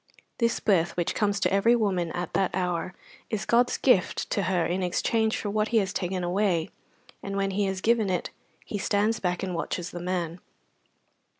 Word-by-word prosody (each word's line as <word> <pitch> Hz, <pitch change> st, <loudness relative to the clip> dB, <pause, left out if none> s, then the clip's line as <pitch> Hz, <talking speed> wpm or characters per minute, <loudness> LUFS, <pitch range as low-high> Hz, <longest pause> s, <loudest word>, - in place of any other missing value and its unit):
This 235 Hz, -1 st, +1 dB
birth 175 Hz, -5 st, +1 dB
which 175 Hz, -, 0 dB
comes 205 Hz, -2 st, +1 dB
to -, -, +2 dB
every 225 Hz, +5 st, +4 dB
woman 185 Hz, -7 st, 0 dB
at 175 Hz, -1 st, -4 dB
that 195 Hz, -2 st, +2 dB
hour 180 Hz, -1 st, -2 dB, 0.3 s
is 215 Hz, -1 st, -2 dB
God's 245 Hz, +1 st, +3 dB
gift 200 Hz, -9 st, +2 dB
to 200 Hz, -, +1 dB
her 175 Hz, -3 st, +1 dB
in 180 Hz, +2 st, -1 dB
exchange 220 Hz, +5 st, +1 dB
for 205 Hz, -, -3 dB
what 215 Hz, +1 st, +1 dB
He 235 Hz, -, +1 dB
has 195 Hz, -3 st, +1 dB
taken 180 Hz, -1 st, -2 dB
away, 175 Hz, -2 st, 0 dB, 0.5 s
and 200 Hz, 0 st, -4 dB
when 195 Hz, 0 st, 0 dB
He 200 Hz, +1 st, 0 dB
has 190 Hz, -1 st, -2 dB
given 225 Hz, -2 st, +2 dB
it 180 Hz, -2 st, -1 dB, 0.3 s
He 205 Hz, -, -4 dB
stands 210 Hz, +3 st, +1 dB
back 180 Hz, -1 st, -1 dB
and 185 Hz, -1 st, -2 dB
watches 175 Hz, +2 st, -3 dB
the 175 Hz, -, -6 dB
man. 175 Hz, -1 st, -2 dB
190 Hz, 190 wpm, -27 LUFS, 180-210 Hz, 0.5 s, every